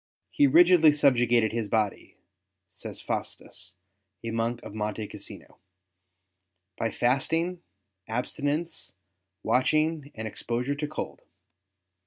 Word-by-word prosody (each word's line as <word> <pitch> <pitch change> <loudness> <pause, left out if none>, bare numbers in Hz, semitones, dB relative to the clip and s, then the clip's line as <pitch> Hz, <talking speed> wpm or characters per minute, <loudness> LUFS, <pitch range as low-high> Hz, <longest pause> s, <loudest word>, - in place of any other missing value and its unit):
He 145 - +4
rigidly 165 +1 +7
subjugated 120 -6 +3
his 115 -2 -2
body," 105 -2 -1 0.5
says - - -7
Faustus, 90 - -6 0.5
a 115 - -3
monk 115 +1 -1
of - - -9
Monte 105 0 -3
Cassino, - - -10 0.6
'' 95 0 -54
by 115 - +1
fasting, 165 +10 0 0.5
abstinence, 145 +8 -3 0.5
watching, 150 +5 +1
and 110 0 -4
exposure 120 +5 -2
to 150 +1 -3
cold. 155 - -6
120 Hz, 105 wpm, -27 LUFS, 110-150 Hz, 0.6 s, rigidly